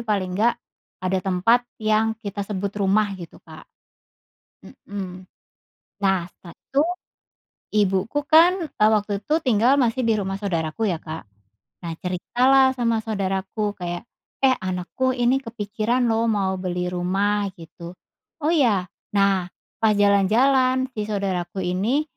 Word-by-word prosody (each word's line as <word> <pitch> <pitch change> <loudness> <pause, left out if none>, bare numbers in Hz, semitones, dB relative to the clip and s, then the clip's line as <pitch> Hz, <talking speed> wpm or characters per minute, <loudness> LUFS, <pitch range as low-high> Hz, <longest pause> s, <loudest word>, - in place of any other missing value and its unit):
paling 200 -5 -1
nggak 235 +2 +4 0.5
ada 185 +1 +1
tempat 200 +6 +3 0.2
yang 215 +1 +2
kita 200 0 -4
sebut 200 0 -4
rumah 205 +2 +3
gitu, 170 -3 -10
Kak. - - -12 1.0
Mhm. 185 -2 -8 0.8
Nah 190 -3 +2
setelah 170 -2 -15
itu, 280 +2 0 0.9
ibuku 205 +7 +1
kan, 335 +4 +6
eee, 215 - +3
waktu 210 -2 +1
itu 300 - 0
tinggal 245 +1 +3
masih 250 0 +1
di 225 - +3
rumah 195 -1 -3
saudaraku 175 0 -2
ya, 170 - -2
Kak. 160 0 -6 0.6
Nah 170 - -4
cerita 180 +6 -4
lah 270 -1 +7
sama 230 -3 +1
saudaraku 195 0 -2
kayak, 175 -1 -4 0.4
"Eh, 260 -1 +5
anakku 185 +8 -2
ini 250 +2 +2
kepikiran 230 0 -2
lo 225 +1 +1
mau 195 -3 0
beli 180 -1 -2
rumah." 200 +3 0
Gitu. 170 +1 -11 0.5
"Oh, 310 - +2
ya?" 240 - +3 0.3
Nah, 195 -2 +2 0.3
pas 220 -2 +3
jalan-jalan 255 +6 +3
si 210 -4 -4
saudaraku 195 -2 -2
ini 205 +11 0
205 Hz, 135 wpm, -23 LUFS, 185-235 Hz, 1.0 s, lah